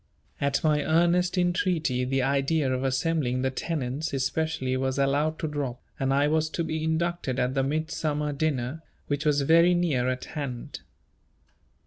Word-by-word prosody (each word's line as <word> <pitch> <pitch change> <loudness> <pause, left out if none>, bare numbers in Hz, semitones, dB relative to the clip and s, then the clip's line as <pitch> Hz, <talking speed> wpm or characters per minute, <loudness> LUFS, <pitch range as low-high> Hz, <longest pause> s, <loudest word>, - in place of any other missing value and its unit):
At 140 -1 +1
my 150 -2 +2
earnest 175 +3 +2
entreaty, 175 -7 +1
the 135 0 0
idea 140 +1 +1
of 130 +1 -2
assembling 135 -1 0
the 130 - +1
tenants 145 0 -3
especially 135 -1 -1
was 130 0 -1
allowed 145 +3 +1
to 160 - -2
drop, 140 -5 -3 0.2
and 135 0 +1
I 140 +2 +3
was 155 +1 +1
to 170 - +1
be 160 -1 -3
inducted 160 -4 -1
at 125 0 0
the 135 - +1
Midsummer 150 +1 -1
dinner, 140 -1 -1 0.2
which 145 +1 -2
was 145 -1 +3
very 170 +5 +5
near 145 -8 +1
at 130 0 -3
hand. 130 -5 -6
145 Hz, 155 wpm, -27 LUFS, 130-160 Hz, 0.2 s, very